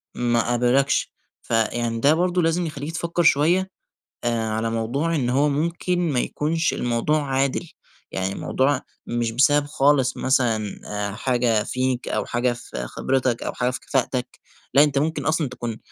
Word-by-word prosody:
ما 120 0 +1
قبلكش، 125 +3 +2 0.3
فيعني 115 0 0
ده 140 +6 +5
برضو 180 +2 +1
لازم 165 +1 +1
يخلّيك 150 -1 -5
تفكر 170 +1 -1
شوية، 170 +5 +3 0.5
آآ 115 -2 0
على 110 +1 -1
موضوع 125 +9 -1
إن 130 -5 0
هو 140 +4 +3
ممكن 170 +4 -1
ما 130 - +1
يكونش 160 +6 0
الموضوع 125 +6 0
عادل، 135 +4 -1 0.4
يعني 95 +1 -2
الموضوع 135 +5 0 0.2
مش 120 -1 -1
بسبب 145 +4 +3
خالص 145 -3 +2
مثلًا 115 -6 0
آآ 105 -1 -3
حاجة 120 -2 +1
فيك 130 0 -2
أو - - -1
حاجة 120 +1 0
في 60 - -7
خبرتك 130 - -1
أو - - -3
حاجة 125 - 0
في 125 - -5
كفاءتك، 125 -1 -2 0.3
لأ، 140 - +7
أنت 145 -2 0
ممكن 155 +3 0
أصلًا 155 -3 +1
تكون 120 -3 -5
130 Hz, 155 wpm, -23 LUFS, 120-150 Hz, 0.5 s, لأ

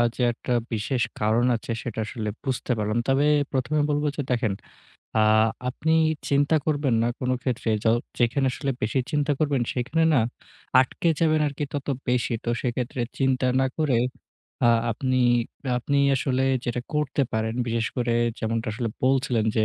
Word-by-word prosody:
যে - - -4
একটা 125 - -6 0.2
বিশেষ 120 +4 -1 0.2
কারণ 110 +3 +2
আছে 115 - -5
সেটা 115 -2 -5
আসলে 110 -1 -4
বুঝতে 130 -2 -2
পারলাম। 105 +2 0
তবে 135 +2 +3 0.3
প্রথমে 135 +3 0
বলব 145 0 +1
যে 145 - -2
দেখেন, 115 -5 +1 0.6
আ - - +4 0.5
আপনি 160 +5 -1 0.4
চিন্তা 145 +2 +3
করবেন 145 -5 +1
না 120 - +2
কোনো 130 0 0
ক্ষেত্রে 125 -2 -2 0.2
য - - 0 0.3
যেখানে 125 +3 +2
আসলে 140 - -2
বেশি 110 +5 0
চিন্তা 145 -1 +1
করবেন 140 -5 +1
সেখানে 140 +6 0
না 135 - +4 0.6
আটকে 150 +5 0
যাবেন 155 -2 +3
আরকি 145 +1 -4
তত 145 -2 -4 0.2
বেশি। 125 -1 +1
তো - - -3
সেক্ষেত্রে 125 0 -2 0.2
চিন্তা 130 -1 +2
না 130 - +3
করে 145 -6 +2 0.7
আ - - +6 0.2
আপনি 130 +3 -1 0.6
আপনি 140 +3 -1 0.2
আসলে 130 0 0 0.2
যেটা 120 0 -2
করতে 150 -1 +1
পারেন, 110 +1 -1
বিশেষ 115 0 0
করে 120 -1 0 0.3
যেমনটা 115 0 -2
আসলে 115 0 -2
বলছিলেন 130 -4 +2
যে 110 - +4
130 Hz, 160 wpm, -25 LUFS, 115-140 Hz, 0.7 s, আ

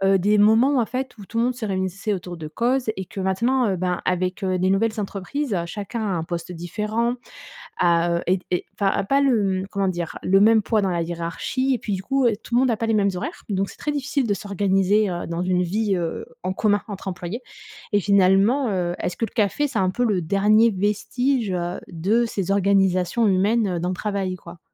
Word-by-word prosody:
heu, - - +3
des 210 +3 +3
moments, 225 +7 +5
en - - 0
fait, 255 +2 -4
où 205 - -10
tout 230 - -6
le 235 - +3
monde 250 0 -1
se 235 -3 -5
réunissait 195 +1 -2
autour 180 -1 -5
de 155 -2 -7
causes 240 +7 0
et 190 - -4
que 195 - -6
maintenant, 230 +6 +1
heu, 190 - -1
ben 180 0 -1
avec, 185 +2 -1
heu, 185 -1 0
des 185 +1 +2
nouvelles 220 +3 +1
entreprises, 210 +4 -3
chacun 205 +5 -5
a 215 - -1
un 160 - -3
poste 170 +1 -5
différent, 210 +8 -2 0.6
a 170 0 +3
heu, 170 - -2
est 185 0 +1
est, 180 - 0
enfin, 195 -1 0
pas 275 +8 +2
le, 210 -9 +2
hem 190 - -5
comment 200 -1 0
dire, 175 -3 -3
le 195 +1 +4
même 220 +1 +5
poids 215 0 +1
dans 190 - +1
la 170 -1 0
hiérarchie 170 +11 -2
et - - -2
puis 205 - -4
du 190 - -2
coup, 270 +2 +1 0.2
tout 235 - -6
le - - +6
monde 260 -1 +3
a 225 - 0
pas 230 - -2
les 225 - +1
mêmes 200 -2 +3
horaires. 180 - -6
Donc 195 0 -1
c'est - - -14
très 295 - -3
difficile 280 -2 -1
de 205 - +1
s'organiser, 200 +1 +1
heu, 175 0 -4
dans 170 +1 -2
une 180 0 +1
vie, 200 +3 0
heu, 170 -2 -3 0.2
en 185 - -1
commun, 205 +1 +1
entre 200 -1 -7
employés 180 +4 -4 0.5
et 205 - +3
finalement, 200 +7 +3
heu, 180 -3 -1
est-ce 175 - -3
que - - -1
le - - -13
café, 235 +7 +1
c'est 260 -6 -3
un 185 -1 +2
peu 245 +6 -1
le 205 -6 +1
dernier 210 +6 +4
vestige, 215 +4 0
heu, 175 -1 -2
de 195 +8 +1
ces 195 -5 -3
organisations 195 +1 +2
humaines 200 0 +2
dans 175 +2 -2
le - - -2
travail 195 -1 -2
quoi? 170 0 -12
200 Hz, 230 wpm, -23 LUFS, 180-225 Hz, 0.6 s, le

